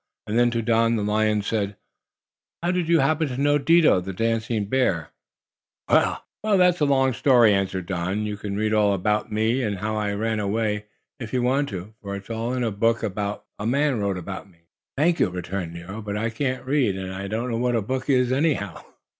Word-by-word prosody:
And 110 +3 0
then 120 0 +4
to 115 -1 -2
Don 115 0 +3
the 105 - -1
lion 105 0 +1
said: 100 -2 -2 0.9
"How 175 - +2
do 180 - 0
you 165 -2 +3
happen 155 +3 +2
to 125 -2 -5
know 145 +1 +3
Dido, 155 - +4
the 95 +2 -6
dancing 115 0 -1
bear?" 100 - 0 0.8
"Well, - - +2 0.2
that's 180 -4 +3
a 150 - +3
long 135 -2 +3
story," 120 -4 +5
answered 95 -2 -1
Don. 95 +3 -2
"You 105 -1 -3
can 100 -1 -5
read 110 +1 0
all 105 -2 +3
about 105 +3 -1
me, 110 +4 +1
and 105 -5 -1
how 110 +3 -2
I 105 -1 -1
ran 110 +1 -1
away, 105 0 -1 0.3
if 115 -2 -7
you 125 -1 +1
want 135 +3 +1
to, 95 +2 -7
for 100 -1 -5
it's 100 +3 -8
all 115 +2 -2
in 125 - -1
a 115 - 0
book 115 +3 +1
a 105 0 -3 0.2
man 140 0 +1
wrote 100 -2 -1
about 95 +2 -7
me." 85 -3 -26 0.4
"Thank 170 +4 +2
you," - - +3
returned 90 0 -4
Nero. 90 +6 -7
"But 105 -1 -4
I 115 +1 -1
can't 130 +2 -2
read, 130 -7 +1
and 95 0 -5
I 95 +1 -5
don't 115 +4 -2
know 115 - -1
what 125 0 +1
a 115 - +1
book 130 +5 -3
is, 125 -2 +3
anyhow." 135 - 0
110 Hz, 210 wpm, -24 LUFS, 100-130 Hz, 0.9 s, story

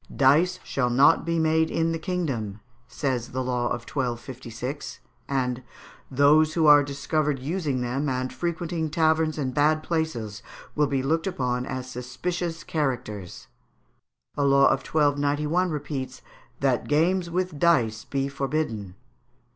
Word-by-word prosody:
"Dice 160 +7 +4
shall 125 -3 -1
not 140 +7 +4
be 170 0 0
made 160 0 +2
in 165 0 0
the 165 - -2
kingdom," 135 - -3 0.3
says 125 0 -3
the 130 0 -1
law 125 -1 -1
of 120 0 -1
1256; 125 +1 -5 0.3
and 130 -2 -1 0.5
"those 150 +3 +4
who 165 -2 +3
are 145 -1 +8
discovered 145 +1 -1
using 145 -1 -2
them, 130 +4 -1
and 130 0 -2
frequenting 170 -1 -2
taverns 160 -1 +2
and 130 -4 -2
bad 155 +2 +2
places, 120 -11 -2 0.3
will 150 -1 +2
be 135 -1 -1
looked 160 +6 0
upon 125 -7 -1
as 130 -1 -4
suspicions 165 +7 -4
characters." 125 - -3 0.9
A 145 - 0
law 140 0 +5
of 135 - +4
1291 150 +4 +1
repeats, 145 -4 -5 0.4
"That 130 -3 +1
games 170 +4 +2
with 180 -3 -2
dice 115 -11 +2
be 135 0 -2
forbidden." 135 -9 -3
140 Hz, 135 wpm, -25 LUFS, 125-160 Hz, 0.9 s, are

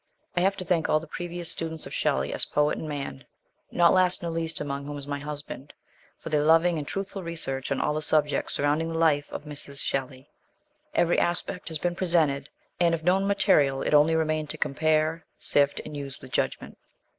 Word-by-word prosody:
I 175 - +2
HAVE 195 +2 +2
to 185 - -5
thank 165 -2 +1
all 155 - +4
the 160 - -10
previous 175 +1 -5
students 160 -1 -4
of - - -8
Shelley - - 0
as - - +2
poet 150 0 +1
and 155 - -5
man 140 - -5 0.5
not 170 -1 +4
last 185 -1 +2
nor 170 - -2
least 165 -1 -2
among 140 -1 -4
whom 145 0 -5
is 140 - -7
my 145 0 -3
husband 145 -1 -6 0.4
for - - -8
their 150 -1 +2
loving 165 +2 +4
and 145 - -6
truthful 195 0 -4
research 155 -6 -4
on 135 - +1
all 150 - +1
the 155 - -2
subjects 150 -1 +1
surrounding 150 +3 +1
the 165 - -2
life 150 -3 +2
of - - -6
Mrs. 145 -1 -3
Shelley. 135 0 -3 0.6
Every 175 0 +3
aspect 175 +1 -1
has 160 -2 -2
been 175 +3 -1
presented, 160 -6 +1 0.3
and 170 -1 +4
of 165 - -8
known 190 +3 +3
material 145 -9 +3
it - - -1
only 150 +2 +5
remained 155 -1 0
to - - -1
compare, 155 +2 +1
sift, 145 0 +2
and 150 - -7
use 140 -2 -6
with - - -12
judgment. - - -2
155 Hz, 205 wpm, -27 LUFS, 145-170 Hz, 0.6 s, only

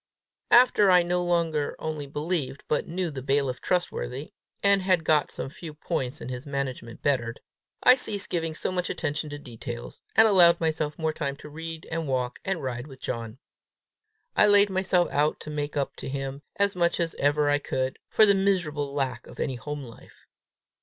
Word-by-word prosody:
After 240 -5 +6
I 180 -1 +6
no 180 +1 0
longer 165 -4 0
only 155 -2 -4
believed, 150 -1 -3
but 150 - 0
knew 175 0 -2
the 135 -2 -6
bailiff 135 -1 0
trustworthy, 155 -6 -2 0.3
and 200 -1 +5
had 185 -3 +2
got 150 -1 +3
some 135 - -6
few 155 -1 -9
points 140 -5 -3
in - - -6
his 125 +3 -6
management 130 -4 -4
bettered, 120 -5 0 0.4
I 250 - +9
ceased 210 -6 -2
giving 165 -2 -1
so - - -2
much 180 -1 -1
attention 155 0 -2
to 145 - -6
details, 120 -3 -8
and 220 - +8
allowed 175 -4 +6
myself 155 -2 -1
more 160 -1 -1
time 140 -3 -3
to 150 - -12
read 160 +1 -7
and 165 -1 -2
walk 130 -1 -1
and 190 -6 -2
ride 125 0 -4
with 135 -3 -12
John. 115 -1 -5 1.0
I 210 - +6
laid 205 -1 +6
myself 185 -2 +2
out 150 +2 +1
to 155 - -7
make 145 -1 -3
up 140 - -1
to - - -6
him, 135 0 -4
as 200 -1 +1
much 170 0 +1
as 170 -1 0
ever 145 +1 +2
I 145 0 +3
could, 130 -2 -2
for 215 - +6
the 200 - +5
miserable 175 -8 0
lack 130 -4 -2
of - - -13
any 135 - -1
home 145 +4 -5
life. 115 -3 -15
150 Hz, 185 wpm, -26 LUFS, 135-175 Hz, 1.0 s, I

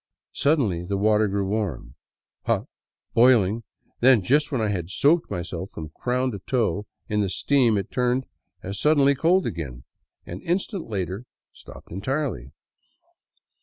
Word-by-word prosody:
Suddenly 125 - +1
the 100 +3 -2
water 105 +1 +3
grew 100 0 -1
warm, 95 - -3 0.5
hot, - - +1 0.5
boiling, 115 -3 +4 0.4
then, 125 -4 +5
just 145 +7 +2
when 130 - 0
I 110 -1 0
had 90 -4 -3
soaped 150 - +3
myself 90 +1 -5
from 80 -1 -8
crown 125 +9 -1
to 100 - -6
toe 105 -2 -1 0.2
in 105 0 0
the 100 - 0
steam, 120 +1 +2
it 100 - -4
turned 125 +1 +1 0.4
as 100 +1 -5
suddenly 145 -2 +4
cold 170 +7 +2
again, 70 -8 -5 0.4
and 90 +2 -7
an - - -18
instant 185 - -2
later 95 +2 -3 0.3
stopped - - -14
entirely. 100 - -3
110 Hz, 145 wpm, -24 LUFS, 95-130 Hz, 0.5 s, then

